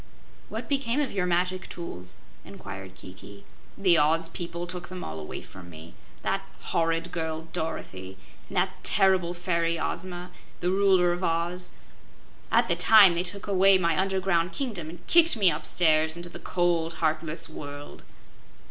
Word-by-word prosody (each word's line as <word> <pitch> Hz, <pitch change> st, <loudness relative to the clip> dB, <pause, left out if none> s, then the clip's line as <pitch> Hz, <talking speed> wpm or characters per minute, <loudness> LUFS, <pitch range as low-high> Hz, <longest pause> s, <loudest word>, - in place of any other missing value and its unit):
"What -, -, -5 dB
became 275 Hz, -2 st, 0 dB
of 285 Hz, -4 st, 0 dB
your 185 Hz, -3 st, -1 dB
magic 180 Hz, +1 st, 0 dB
tools?" 90 Hz, -, -7 dB, 0.2 s
inquired 95 Hz, -1 st, -9 dB
Kiki. 95 Hz, +2 st, -12 dB, 0.3 s
"The 185 Hz, -4 st, +4 dB
Oz 165 Hz, +2 st, +2 dB
people 170 Hz, 0 st, -5 dB
took 175 Hz, 0 st, -6 dB
them 185 Hz, -1 st, -6 dB
all 80 Hz, 0 st, -6 dB
away 75 Hz, -, -7 dB
from 90 Hz, -2 st, -12 dB
me 80 Hz, 0 st, -12 dB, 0.3 s
that -, -, 0 dB, 0.2 s
horrid 165 Hz, +1 st, -1 dB
girl, 160 Hz, -1 st, -4 dB
Dorothy, 95 Hz, -12 st, -5 dB, 0.3 s
and -, -, -6 dB
that -, -, 0 dB
terrible 190 Hz, -3 st, +3 dB
fairy, 170 Hz, -2 st, 0 dB
Ozma, 180 Hz, +1 st, -4 dB, 0.3 s
the 180 Hz, +1 st, 0 dB
Ruler 190 Hz, -2 st, +4 dB
of 175 Hz, +2 st, -3 dB
Oz 175 Hz, +2 st, -1 dB, 0.8 s
at -, -, +4 dB
the -, -, +2 dB
time 205 Hz, -5 st, +7 dB
they 170 Hz, -, 0 dB
took 185 Hz, +2 st, -4 dB
away 195 Hz, -1 st, +5 dB
my 170 Hz, -3 st, +1 dB
underground 190 Hz, -2 st, +1 dB
kingdom 210 Hz, -, -3 dB
and 175 Hz, +1 st, -12 dB
kicked 335 Hz, -5 st, +5 dB
me 195 Hz, -5 st, +5 dB
upstairs 160 Hz, 0 st, +1 dB
into 175 Hz, 0 st, -7 dB
the -, -, -9 dB
cold, 170 Hz, -2 st, 0 dB
heartless 160 Hz, 0 st, -1 dB
world." 145 Hz, 0 st, -9 dB
175 Hz, 155 wpm, -27 LUFS, 160-185 Hz, 0.8 s, time